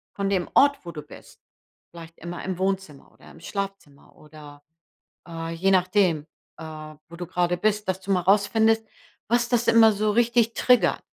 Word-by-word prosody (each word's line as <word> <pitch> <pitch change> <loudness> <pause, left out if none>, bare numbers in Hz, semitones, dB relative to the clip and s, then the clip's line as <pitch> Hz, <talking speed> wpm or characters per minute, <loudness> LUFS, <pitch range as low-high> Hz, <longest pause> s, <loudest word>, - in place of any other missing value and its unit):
von 200 -1 -2
dem 185 -3 -1
Ort, 285 0 +4
wo 170 - -6
du 150 -2 -9
bist. 150 - -16 0.5
Vielleicht 165 -1 -13
immer 175 +1 -7
im 185 -2 -4
Wohnzimmer 190 -6 -3
oder - - -17
im - - -16
Schlafzimmer 195 -6 -7
oder, 150 -1 -15 0.6
äh, 165 -1 -6
je 185 +4 0
nachdem, 185 -4 +2 0.3
äh, 155 -1 -9
wo 170 - -11
du 175 - -6
gerade 175 0 -1
bist, 210 +2 -1
dass 185 0 -2
du 195 +1 -4
mal 185 -2 +2
rausfindest, 220 +4 +2 0.4
was 240 +1 +1
das 240 -1 0
immer 225 -1 +6
so 210 +1 0
richtig 235 +1 +2
trigger 245 -8 +3
190 Hz, 175 wpm, -24 LUFS, 165-215 Hz, 0.6 s, immer